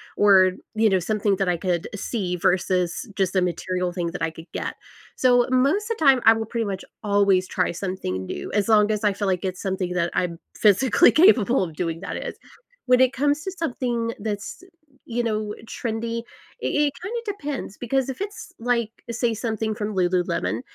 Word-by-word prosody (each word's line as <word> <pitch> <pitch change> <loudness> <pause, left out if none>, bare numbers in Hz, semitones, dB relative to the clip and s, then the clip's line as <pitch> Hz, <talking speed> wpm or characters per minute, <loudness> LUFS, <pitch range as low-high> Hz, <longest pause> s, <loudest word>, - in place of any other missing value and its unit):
or, 190 -2 +5 0.2
you 220 0 +4
know, 190 -2 +3
something 205 +2 0
that 195 -1 0
I 175 - +1
could 175 -1 -2
see 190 -3 -2
versus 180 +4 0
just 190 -1 0
a 185 - +4
material 180 0 -1
thing 175 -1 -3
that 180 - -7
I 165 - +1
could 165 +1 -13
get, - - -3 0.4
so, 245 -1 +4
most 300 - +2
of 455 - -1
the 315 - -1
time, 265 -2 +6
I 225 - +9
will, 225 0 -3
pretty 230 +1 -2
much, 195 -2 -4 0.2
always 200 -3 +3
try 180 - 0
something 170 - -4
new - - -5
as 210 +2 +1
long 210 -1 +5
as 210 0 -2
I 205 - +4
feel 200 +1 -2
like 185 -2 0
it's 185 -1 -3
something 190 -2 -2
that 175 -1 0
I'm 170 -2 -1 0.2
physically 215 - +5
capable 260 - +5
of 165 -3 -10
doing, 165 0 -2
that 195 - -5
is. - - -6 0.5
When 250 -1 +4
it 260 0 +4
comes 290 +3 +1
to 380 - -3
something 245 -9 -2
that's, 205 +4 -5
y 370 - -17 0.4
you 240 0 -2
know, 215 -2 -2
trendy, 230 0 -3 0.4
i - - -1
it 295 -1 +1
kinda 455 +6 -3
depends, 295 - -5
because 265 +2 0
if 265 - -5
it's, 410 +1 -6
like, 235 -2 0 0.2
say, 235 0 0
something 220 -1 -2
from 210 -1 -4
Lululemon, 180 +2 0
210 Hz, 195 wpm, -24 LUFS, 185-245 Hz, 0.5 s, I